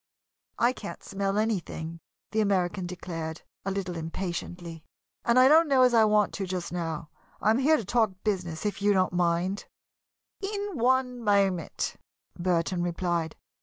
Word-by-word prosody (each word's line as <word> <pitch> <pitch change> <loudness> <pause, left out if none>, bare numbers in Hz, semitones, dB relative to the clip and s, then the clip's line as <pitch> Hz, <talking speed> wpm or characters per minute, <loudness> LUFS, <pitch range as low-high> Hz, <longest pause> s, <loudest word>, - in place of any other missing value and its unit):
"I 240 +2 +3
can't 205 - -8
smell 195 0 -2
anything," 170 -6 -2 0.3
the 220 +1 +2
American 190 -2 +1
declared, 165 -3 -6 0.2
a 195 - -2
little 190 -2 -3
impatiently, 170 0 -5 0.4
"and 235 +1 +3
I 255 +1 +8
don't 320 +3 +6
know 270 -3 +5
as 250 -1 +5
I 225 -2 +6
want 210 -1 +3
to 195 - -3
just 180 -2 -3
now. 165 -3 -4 0.3
I 215 - +3
am 225 - +2
here 310 +4 +4
to 225 - -4
talk 225 +1 +3
business, 180 -5 -2
if 205 -1 -2
you 205 0 +4
don't 185 -2 +2
mind." 175 +3 0 0.7
"In 405 +1 -3
one 250 -1 +1
moment," 195 -5 +1 0.4
Burton 175 0 0
replied. 175 -2 -1
195 Hz, 155 wpm, -28 LUFS, 175-225 Hz, 0.7 s, I